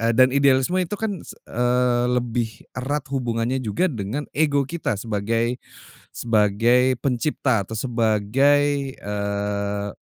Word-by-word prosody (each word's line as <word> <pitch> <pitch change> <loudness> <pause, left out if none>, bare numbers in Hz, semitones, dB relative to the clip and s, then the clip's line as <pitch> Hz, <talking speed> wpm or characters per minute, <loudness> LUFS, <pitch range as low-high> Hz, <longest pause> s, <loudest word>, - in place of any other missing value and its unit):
dan 130 +1 +5
idealisme 140 +5 +3
itu 185 +3 -2
kan 205 -4 -3
se - - -11
eee, 125 0 +1
lebih 120 -3 -2
erat 135 +3 -3
hubungannya 120 0 -1
juga 130 - 0
dengan 115 +6 -3
ego 145 -2 +2
kita 145 -4 -3
sebagai 115 +3 -1 0.5
sebagai 115 +3 +3
pencipta 125 -4 0
atau 110 - -11
sebagai, 135 +5 +2
eee 100 0 -2
125 Hz, 115 wpm, -23 LUFS, 110-140 Hz, 0.5 s, dan